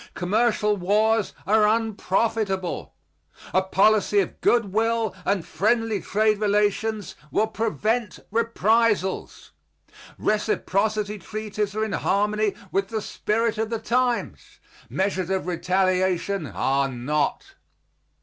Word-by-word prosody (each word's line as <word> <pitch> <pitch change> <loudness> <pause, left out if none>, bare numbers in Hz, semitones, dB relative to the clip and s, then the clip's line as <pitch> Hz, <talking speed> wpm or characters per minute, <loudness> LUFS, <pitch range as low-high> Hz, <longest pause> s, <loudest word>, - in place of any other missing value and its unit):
Commercial 210 +2 +1
wars 210 +3 +2
are 210 +2 +4
unprofitable. 215 -3 -1 0.6
A 185 - +4
policy 200 +2 +3
of 190 - -2
good 230 -5 +2
will 225 -1 +1
and 195 -4 0
friendly 225 -1 0
trade 215 +1 +1
relations 210 0 0 0.2
will 215 - +2
prevent 220 0 -1
reprisals. 225 -3 +1 0.7
Reciprocity 210 0 0
treaties 210 0 -4
are 215 0 0
in 220 - -5
harmony 210 +1 0 0.2
with 195 0 0
the 220 +1 -3
spirit 225 +1 -1
of 220 0 -1
the 230 - -1
times; 245 +2 -1 0.3
measures 190 -2 -1
of 190 -1 -1
retaliation 185 0 0
are 135 0 0
not. 145 - -2
210 Hz, 105 wpm, -24 LUFS, 190-220 Hz, 0.7 s, are